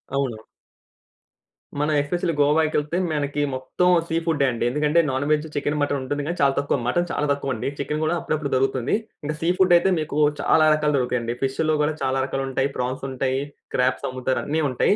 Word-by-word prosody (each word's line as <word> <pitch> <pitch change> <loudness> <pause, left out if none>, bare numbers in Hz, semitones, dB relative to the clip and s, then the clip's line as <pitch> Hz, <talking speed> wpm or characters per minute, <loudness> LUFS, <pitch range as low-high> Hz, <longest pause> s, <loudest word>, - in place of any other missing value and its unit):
అవును. 130 -6 -1 1.4
మనం 150 +1 +1
ఎస్‌పెషల్లీ 170 +4 -1
గోవాకి 155 +2 +3
ఎళ్తే 150 +4 -3
మనకి 145 -1 -1
మొత్తం 130 +7 0 0.2
సీ 165 - -2
ఫుడే 150 -5 +2
అండి. 115 - -3
ఎందుకంటే 150 +5 +2
నాన్ 130 +2 -1
వేజ్ 155 0 +2
చికెను, 145 +1 -1
మటను 145 -1 0
ఉంటుంది 145 +2 -3
గానీ 170 +3 -3
చాలా 140 -1 +4
తక్కువ, 140 0 +1
మటను 175 +7 +1
చాలా 150 - -1
తక్కువ 140 -2 -1
అండి. 115 - -4
చికెను 150 +2 -2
గూడా 165 +2 +1
అప్పుడప్పుడు 150 -3 -2
దొరుకుతుంది. 130 +3 +1 0.3
ఇంకా 150 +1 -2
సీ 165 - +1
ఫుడాయితే 180 0 +5
మీకు 155 -1 -3 0.2
చాలా 155 +2 +4
రకాలు 150 -1 +1
దొరుకుతాయి 125 -1 0
అండి. 115 +1 -3
ఫిష్‌లో 155 +4 +1
గూడా 155 +1 +1
చాలా 135 0 0
రకాలు 135 0 -3
ఉంటాయి, 135 +1 0
ప్రాన్స్ 125 +2 -3
ఉంటాయి, 130 0 -1 0.4
క్రాబ్స్ 125 0 +1
అమ్ముతారు 130 0 -1
అన్ని 155 +2 0
ఉంటాయి. 130 +10 +2
145 Hz, 185 wpm, -23 LUFS, 130-155 Hz, 1.4 s, ఫుడాయితే